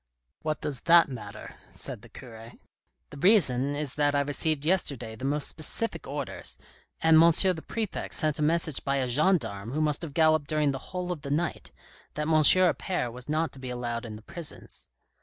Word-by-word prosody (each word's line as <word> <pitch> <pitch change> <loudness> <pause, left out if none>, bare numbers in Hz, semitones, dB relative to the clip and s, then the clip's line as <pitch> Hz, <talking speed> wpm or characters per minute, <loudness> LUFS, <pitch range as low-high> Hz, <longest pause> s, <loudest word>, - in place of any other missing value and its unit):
What 155 -1 -3
does 140 -5 -3
that 170 -2 +7
matter? 105 -6 -9
" - - -26
said - - -6
the 120 - -15
cure. 115 0 -12 0.6
"The - - -10
reason 140 - +4
is 145 -2 -2
that 145 -1 +1
I 140 - +3
received 145 +1 -1
yesterday 140 -10 -1
the 125 - -7
most 145 +1 -1
specific 195 +8 -3
orders, - - -5 0.4
and 160 0 +6
M. 170 - +7
the 175 0 +3
Prefect 220 -4 -4
sent 155 -2 +1
a - - -2
message 160 -1 +1
by 140 - 0
a 130 -2 0
gendarme 125 - 0
who 155 - -1
must 150 -1 +1
have 155 -5 -7
galloped 155 -2 +3
during 150 -1 +1
the 135 - -5
whole 180 -1 -4
of 165 -5 -5
the 140 - -7
night, 155 +4 -2 0.4
that 150 - -2
M. 160 +1 0
Appert 165 -4 +3
was 125 +3 -9
not 160 +2 0
to 135 - -11
be 130 -1 -7
allowed 120 -1 -4
in 110 - -8
the 105 - -12
prisons." 165 +5 -6
150 Hz, 195 wpm, -27 LUFS, 130-160 Hz, 0.6 s, that